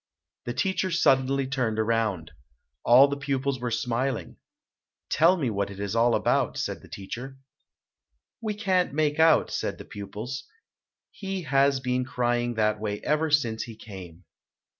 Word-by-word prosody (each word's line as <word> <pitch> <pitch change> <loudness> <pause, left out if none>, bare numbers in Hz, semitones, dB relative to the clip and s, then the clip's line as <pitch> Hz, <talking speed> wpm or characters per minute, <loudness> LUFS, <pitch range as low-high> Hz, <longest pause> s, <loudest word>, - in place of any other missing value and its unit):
The 120 - -4
teacher 190 0 0
suddenly 135 -5 +2
turned 125 -5 -1
around. 110 -7 0 0.5
All 125 +4 +7
the 140 - -2
pupils 140 -1 -2
were 120 0 -2
smiling. 120 +2 -2 0.7
"Tell 170 +4 +5
me 135 -8 -1
what 100 -1 -1
it 100 -1 -9
is 100 +1 -3
all 115 0 +4
about", - - +1
said - - -3
the - - -15
teacher. 125 +7 -7 1.0
"We 215 -2 -2
can't 185 -7 +1
make 150 0 +1
out", 160 -1 +5
said - - -2
the - - -10
pupils, 105 +7 -7 0.7
"he 195 -2 -5
has 140 -1 +3
been 125 0 0
crying 120 -1 -1
that 105 -1 +1
way 105 -1 -3
ever 155 +1 +1
since 120 -7 +1
he 115 - -7
came." 95 -6 -11
125 Hz, 150 wpm, -26 LUFS, 110-145 Hz, 1.0 s, All